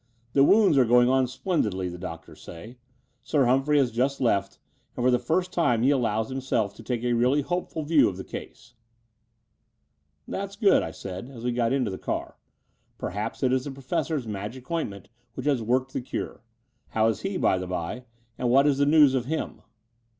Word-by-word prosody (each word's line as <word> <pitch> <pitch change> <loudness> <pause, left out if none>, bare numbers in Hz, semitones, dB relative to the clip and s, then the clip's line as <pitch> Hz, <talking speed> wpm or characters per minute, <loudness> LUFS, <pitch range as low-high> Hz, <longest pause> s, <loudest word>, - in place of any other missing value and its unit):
The 135 - +5
wounds 195 -4 +5
are - - +6
going 120 +1 +4
on 130 -1 +3
splendidly, 115 - -1
the 90 0 -7
doctors 80 -3 -9
say. 110 +10 -11 0.4
Sir 135 +3 +1
Humphrey 135 +4 +3
has 130 -4 +3
just 130 +4 0
left: 100 -5 0 0.4
and 125 - -1
for 130 - +5
the 125 - +3
first 180 +3 -1
time 120 -9 +2
he 135 - +4
allows 110 -4 0
himself 130 -6 -1
to - - -13
take 120 +1 -3
a 120 0 +1
really 125 +5 +2
hop^ul 175 -1 -3
view 155 -7 +5
of 95 - -7
the 95 - -6
case." 120 +5 -10 1.5
"That's 200 0 -5
good," 200 -1 +4
I - - -4
said, 95 +6 -7
as 120 -4 -10
we 125 - 0
got 120 -1 0
into 130 -6 0
the 95 - -6
car. - - -4 0.6
"Perhaps 105 +8 -4
it 130 -1 +3
is 130 -1 0
the - - -4
Professor's 135 +1 -2
magic 110 +7 -6
ointment 100 - -3 0.3
which - - -6
has 140 -5 +2
worked 130 +4 0
the - - -2
cure. 125 - -5 0.5
How 110 0 +1
is 115 - -1
he, 195 -1 -2
by 95 - +2
the 90 - -5
by, 90 +8 -4 0.3
and 125 - 0
what 135 +3 +5
is 140 -2 +2
the 140 - +3
news 150 -3 +6
of 130 -2 0
him?" 160 +4 -4
125 Hz, 195 wpm, -26 LUFS, 110-140 Hz, 1.5 s, are